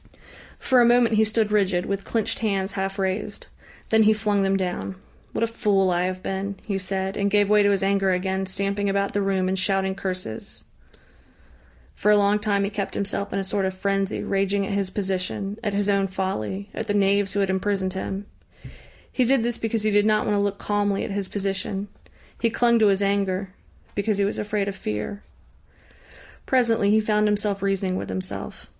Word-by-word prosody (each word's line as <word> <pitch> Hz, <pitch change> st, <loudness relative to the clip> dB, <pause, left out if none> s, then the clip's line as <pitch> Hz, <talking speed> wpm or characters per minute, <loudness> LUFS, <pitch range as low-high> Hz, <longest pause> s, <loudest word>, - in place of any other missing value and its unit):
For 255 Hz, -2 st, +3 dB
a -, -, +6 dB
moment 240 Hz, -1 st, +4 dB
he 220 Hz, 0 st, +4 dB
stood 220 Hz, -1 st, +1 dB
rigid, 190 Hz, -4 st, +2 dB
with 200 Hz, 0 st, -3 dB
clenched 225 Hz, -3 st, -1 dB
hands 195 Hz, -3 st, 0 dB
half 195 Hz, 0 st, -2 dB
raised. 195 Hz, +2 st, -2 dB, 0.4 s
Then 220 Hz, 0 st, +4 dB
he 215 Hz, 0 st, +6 dB
flung 210 Hz, -1 st, 0 dB
them 195 Hz, 0 st, +2 dB
down. 190 Hz, 0 st, -3 dB, 0.4 s
"What -, -, -1 dB
a -, -, +5 dB
fool 200 Hz, -4 st, +1 dB
I 175 Hz, +1 st, +1 dB
have 185 Hz, 0 st, -4 dB
been!" 195 Hz, +1 st, -3 dB
he 200 Hz, -2 st, -1 dB
said, 190 Hz, +1 st, -2 dB
and 200 Hz, 0 st, +1 dB
gave 205 Hz, 0 st, +3 dB
way 210 Hz, 0 st, +6 dB
to 205 Hz, -, +4 dB
his 195 Hz, -1 st, +1 dB
anger 195 Hz, 0 st, +2 dB
again, 190 Hz, +1 st, 0 dB
stamping 200 Hz, +1 st, -1 dB
about 200 Hz, 0 st, 0 dB
the 205 Hz, -, +1 dB
room 190 Hz, -1 st, +1 dB
and 190 Hz, 0 st, 0 dB
shouting 190 Hz, 0 st, +1 dB
curses.... 185 Hz, -, -5 dB, 1.3 s
For 210 Hz, -, 0 dB
a 210 Hz, -, +7 dB
long 205 Hz, +1 st, +3 dB
time 205 Hz, -2 st, +1 dB
he 200 Hz, -, -1 dB
kept 200 Hz, -2 st, -3 dB
himself 200 Hz, 0 st, -2 dB
in -, -, -2 dB
a 195 Hz, -, 0 dB
sort 195 Hz, +1 st, -1 dB
of 190 Hz, 0 st, -2 dB
frenzy, 195 Hz, +1 st, -1 dB
raging 195 Hz, 0 st, 0 dB
at 200 Hz, -, -3 dB
his 200 Hz, -2 st, 0 dB
position, 195 Hz, +1 st, -3 dB
at 205 Hz, -3 st, -1 dB
his 205 Hz, 0 st, +1 dB
own 200 Hz, -1 st, +2 dB
folly, 190 Hz, -, -3 dB
at -, -, -4 dB
the 205 Hz, -, 0 dB
knaves 200 Hz, -1 st, +2 dB
who 200 Hz, -, 0 dB
had 195 Hz, -1 st, +1 dB
imprisoned 190 Hz, -1 st, -1 dB
him. 195 Hz, +1 st, -4 dB, 0.9 s
He 255 Hz, -, +2 dB
did 255 Hz, 0 st, +3 dB
this 240 Hz, 0 st, -2 dB
because 225 Hz, -1 st, -1 dB
he 215 Hz, -, +2 dB
did 205 Hz, +1 st, +4 dB
not 215 Hz, 0 st, +2 dB
want 210 Hz, -, +1 dB
to 200 Hz, -, +2 dB
look 200 Hz, 0 st, -1 dB
calmly 205 Hz, -1 st, 0 dB
at -, -, -4 dB
his 195 Hz, -1 st, -3 dB
position. 195 Hz, 0 st, -3 dB, 0.5 s
He 230 Hz, -, +2 dB
clung 235 Hz, 0 st, +3 dB
to 215 Hz, -, +5 dB
his 200 Hz, 0 st, +2 dB
anger 195 Hz, -1 st, 0 dB, 0.4 s
because 205 Hz, 0 st, 0 dB
he 200 Hz, -, +2 dB
was 200 Hz, -, -2 dB
afraid 205 Hz, -1 st, -1 dB
of 200 Hz, -, -3 dB
fear. 105 Hz, -, -4 dB, 1.3 s
Presently 230 Hz, -5 st, +3 dB
he 215 Hz, +1 st, +5 dB
found 210 Hz, 0 st, +2 dB
himself 205 Hz, -1 st, 0 dB
reasoning 195 Hz, -1 st, 0 dB
with -, -, -5 dB
himself. 185 Hz, 0 st, -5 dB
200 Hz, 200 wpm, -24 LUFS, 190-210 Hz, 1.3 s, a